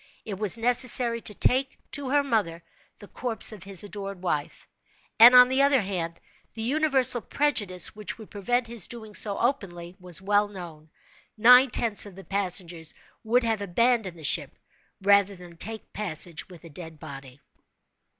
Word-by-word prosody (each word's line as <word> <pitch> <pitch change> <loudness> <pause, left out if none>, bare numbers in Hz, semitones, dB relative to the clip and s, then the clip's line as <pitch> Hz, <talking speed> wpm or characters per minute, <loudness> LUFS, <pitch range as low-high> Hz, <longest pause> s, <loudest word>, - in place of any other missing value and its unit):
It 200 -3 -7
was 210 +1 +3
necessary 240 0 +2
to 210 - -7
take 265 +2 0
to 285 -3 -2
her 285 +1 +2
mother 205 -11 -2 0.3
the 205 - -14
corpse 235 -1 -2
of 210 -3 -11
his 195 0 -7
adored 200 -2 -8
wife, 150 -5 -4 0.5
and, 240 +3 +9
on 250 0 +9
the 260 +2 +1
other 280 -2 +3
hand, 175 -4 -5 0.4
the 225 - -5
universal 265 -2 +2
prejudice 210 -14 0
which 210 -1 -7
would 220 -2 -14
prevent 245 +5 -1
his 230 -3 -2
doing 220 -3 -10
so 205 -1 +1
openly 185 -9 -3
was 180 -2 -4
well 205 +2 +1
known. 170 -6 -11 0.5
Nine 250 +4 +6
tenths 220 -3 +2
of 195 - -13
the 195 - -12
passengers 180 -5 -2 0.3
would 240 +3 +1
have 225 -2 -1
abandoned 205 -1 0
the 160 - -13
ship - - +2 0.5
rather 200 0 +3
than 175 -2 -14
take 220 +6 -6
passage 175 -4 -2
with 175 -3 -14
a 165 - -12
dead 160 0 -11
body. 135 -3 -11
205 Hz, 165 wpm, -25 LUFS, 180-240 Hz, 0.5 s, and